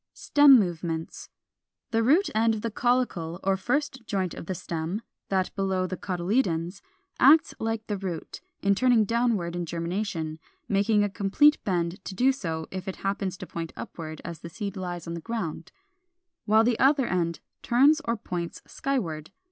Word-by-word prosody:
465. - - -12
=Stem 285 -3 +8
movements.= 165 -1 -5 0.6
The 225 0 +2
root 310 - +3
end 225 +1 +3
of 215 - -5
the 230 - -2
caulicle 220 -9 0
or 195 0 +2
first 265 +5 -1
joint 190 -4 -1
of - - -9
stem 170 +6 -4 0.3
(that 190 -1 0
below 190 -1 0
the 185 - -3
cotyledons) 180 -1 -1 0.4
acts 290 +3 +6
like 225 0 -2
the 205 - -2
root, 180 -4 -5 0.2
in 200 0 +4
turning 235 0 +4
downward 225 -6 0
in 175 -1 -3
germination 170 -1 -3 0.3
(making 205 +1 +3
a - - +2
complete 205 +10 +3
bend 175 -1 -1
to 190 - -6
do 255 +7 +4
so 165 -11 -4
if 185 0 -6
it 190 - -3
happens 195 -1 -1
to 185 - -7
point 165 -2 -6
upward 155 -2 -7
as 170 -1 -6
the 170 - -8
seed 200 +3 -5
lies 180 -2 -5
in 170 - -5
the 170 - -5
ground), 190 -7 -4 0.7
while 220 +1 +5
the 235 0 +1
other 275 -1 +4
end 170 -3 -1 0.2
turns 285 +6 +4
or 230 -4 -1
points 175 -5 -5
skyward. 165 - -3
195 Hz, 170 wpm, -27 LUFS, 170-230 Hz, 0.7 s, =Stem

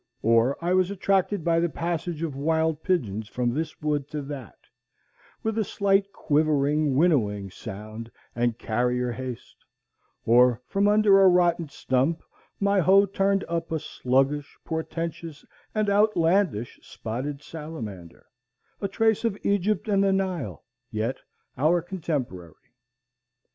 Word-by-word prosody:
Or 115 +4 +3
I 180 - +2
was 185 0 +3
attracted 195 -1 0
by 165 0 +2
the 170 0 +1
passage 170 0 -3
of 155 -5 -3
wild 160 +2 0
pigeons 110 - -1
from 120 -1 -1
this 160 +2 -4
wood 145 -2 0
to 150 -1 -4
that, 135 -3 -8 0.9
with 220 0 -1
a - - +2
slight 200 0 +1
quivering 150 -2 +1
winnowing 105 - +2
sound 110 +3 -8 0.3
and 120 -1 0
carrier 125 +2 0
haste; 125 0 -8 0.6
or 120 +1 +5
from 200 +7 +1
under 205 -2 +5
a 190 - +7
rotten 175 -3 +3
stump 140 +3 0 0.4
my 200 0 +2
hoe 195 +3 +5
turned 195 0 +1
up 170 -1 -3
a 160 - +1
sluggish 135 +1 -1
portentous 165 -1 -5 0.3
and 215 -1 +1
outlandish 195 - +2
spotted 140 +6 -5
salamander, 115 - -8 0.6
a 200 - 0
trace 220 +2 +1
of 225 -4 0
Egypt 200 +1 +1
and 200 -2 +3
the 195 - +3
Nile, 190 -5 -2 0.3
yet 115 +4 -2 0.4
our 160 +5 +4
contemporary. 145 - -4
160 Hz, 130 wpm, -26 LUFS, 125-190 Hz, 0.9 s, a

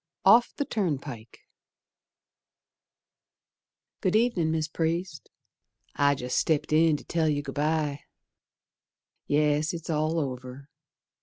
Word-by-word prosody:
Off 240 +1 +6
the 285 - -2
Turnpike 140 - -4 2.6
Good 185 - +1
ev'nin', 220 -8 +2
Mis' 160 -1 -1
Priest. 165 +3 -3 0.7
I 140 0 +3
jest 125 -2 -1
stepped 155 -1 0
in 160 -1 +4
to - - -13
tell 160 -2 0
you 145 -1 -1
Good 135 -2 -6
bye. 150 -1 0 1.3
Yes, 150 +2 +1
it's 165 0 -5
all 155 +2 0
over. 130 0 -6
155 Hz, 105 wpm, -27 LUFS, 145-165 Hz, 2.6 s, Off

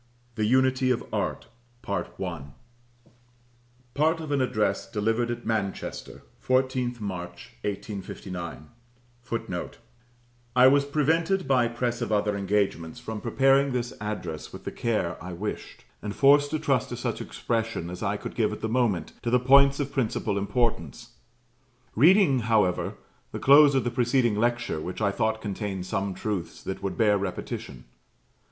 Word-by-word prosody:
THE 110 -2 -1
UNITY 130 +2 +3
OF 125 - +1
ART. - - -2 0.4
Part 100 - -2 2.1
of 155 -2 -6
an 140 -2 +2
Address 105 -5 0
delivered 115 +2 0
at 120 - -4
Manchester, 105 -4 -3 0.2
14th 130 -1 +1
March, 90 -4 -6
1859. 95 -5 -6 0.5
[Footnote: 115 -7 -5 0.8
I 125 0 +7
was 140 +2 +5
prevented, 160 +6 +1
by 125 -3 +3
press 120 +1 -2
of 120 - -2
other 105 -1 +1
engagements, 100 -5 -1
from 110 -1 -6
preparing 135 +3 +3
this 120 -1 -2
address 95 -7 -5
with - - -10
the - - -4
care 110 -7 -2
I 90 0 -6
wished; 100 +5 -6 0.2
and 105 -1 -5
forced 145 +1 +5
to 155 - -1
trust 135 -5 0
to - - -5
such - - -3
expression 115 -7 -3
as 90 - -7
I - - 0
could - - -7
give - - +1
at - - -6
the 110 - -1
moment 115 -6 0
to 120 - -2
the 125 +1 +4
points 140 +2 +5
of 140 -1 -3
principal 110 -5 -1
importance; 100 - -1 0.9
reading, 165 - +5
however, 110 -5 +1 0.4
the - - -4
close 140 +1 +7
of 135 - +2
the 120 - -1
preceding 120 -1 +2
lecture, 120 -6 0
which 90 +3 -5
I 100 -2 +2
thought 110 +2 -1
contained 100 -3 -4
some 95 -1 -2
truths 100 -6 -4
that 95 - -5
would 100 -1 -3
bear 105 -3 +3
repetition. 95 -2 -5
115 Hz, 145 wpm, -26 LUFS, 100-130 Hz, 2.1 s, I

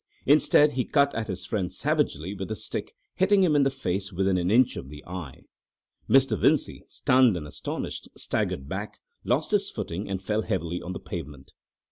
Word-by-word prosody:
Instead, 150 +1 +5
he 130 -2 0
cut 140 +1 +2
at 115 -1 -3
his 95 -2 -5
friend 95 -3 -2
savagely 90 +6 -1
with 95 -1 -5
the 110 - -3
stick, - - -5 0.2
hitting 195 +1 +4
him 160 -5 +3
in 145 - +5
the 135 - +4
face 100 -7 -3
within 95 +1 +1
an 90 0 0
inch 125 +4 +4
of 65 - -7
the 75 0 -11
eye. 85 -7 -7 0.7
Mr. 135 -4 +5
Vincey, - - +1
stunned 125 -6 +3
and 75 - -6
astonished, 75 - -5
staggered 65 0 -2
back, 95 +6 -5 0.3
lost - - 0
his 200 -1 +2
footing, 100 -2 -5
and 95 -1 -2
fell 105 +3 0
heavily 90 -4 -2
on 90 - -5
the - - -6
pavement. 70 -1 -8
100 Hz, 185 wpm, -26 LUFS, 90-130 Hz, 0.7 s, Instead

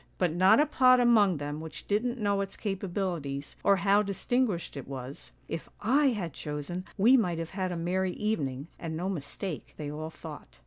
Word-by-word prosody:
But 175 -4 +1
not 190 +5 +6
a 300 - +5
pot 255 -4 +5
among 215 -7 +5
them 145 +1 -4
which 160 0 -8
didn't 240 +5 0
know 200 -3 +1
its 195 0 -5
capabilities, 180 -8 -3
or 200 - +5
how 200 +1 +4
dis 200 -2 -5
tinguished 245 -9 0
it 140 - -7
was, 135 0 -8
' - - -34
If 165 - -5
/ - - -36
had 225 - +2
chosen, 150 +6 -5
we 230 +7 +6
might 180 -9 +2
have 165 0 -4
had 185 -2 -2
a 175 - -3
merry 180 +2 0
evening, 145 -10 -2
and 160 -1 -4
no 180 +3 -2
mistake,' 170 0 -4
they 145 -1 -4
all 155 +1 -5
thought. - - -10
185 Hz, 195 wpm, -29 LUFS, 160-210 Hz, -, not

